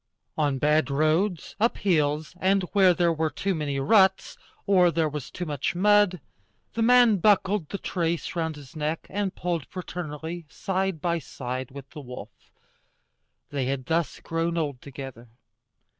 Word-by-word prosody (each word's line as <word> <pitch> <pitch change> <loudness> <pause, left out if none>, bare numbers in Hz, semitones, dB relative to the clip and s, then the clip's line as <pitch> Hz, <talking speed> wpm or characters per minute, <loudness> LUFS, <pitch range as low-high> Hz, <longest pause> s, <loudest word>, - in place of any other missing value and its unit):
On 145 -3 +1
bad 150 +2 +2
roads, 155 +5 +1
up 230 +3 +2
hills, 155 -5 +1
and 190 +1 +2
where 190 -3 +6
there 170 -1 +2
were 160 0 0
too 195 +5 -2
many 145 -4 -2
ruts, 190 +6 +3 0.3
or 185 -3 +5
there 165 -1 +1
was 150 -2 -5
too 180 - -5
much 145 +1 -2
mud, 205 -1 +4 0.5
the 230 - -2
man 240 -2 +6
buckled 195 -3 +2
the 200 - -3
trace 170 -3 -2
round 160 -2 -1
his 145 -2 -13
neck 155 +1 -2
and 200 -1 -2
pulled 170 -5 -2
fraternally, 165 -2 -6
side 190 -1 -2
by 170 -1 0
side 130 -3 -5
with 140 0 -10
the 150 - -8
wolf. 125 -2 -9 1.2
They 140 -3 -1
had 130 0 -2
thus 165 -1 -1
grown 165 +1 -2
old 145 -6 -2
together. 130 -3 -9
165 Hz, 155 wpm, -26 LUFS, 145-190 Hz, 1.2 s, where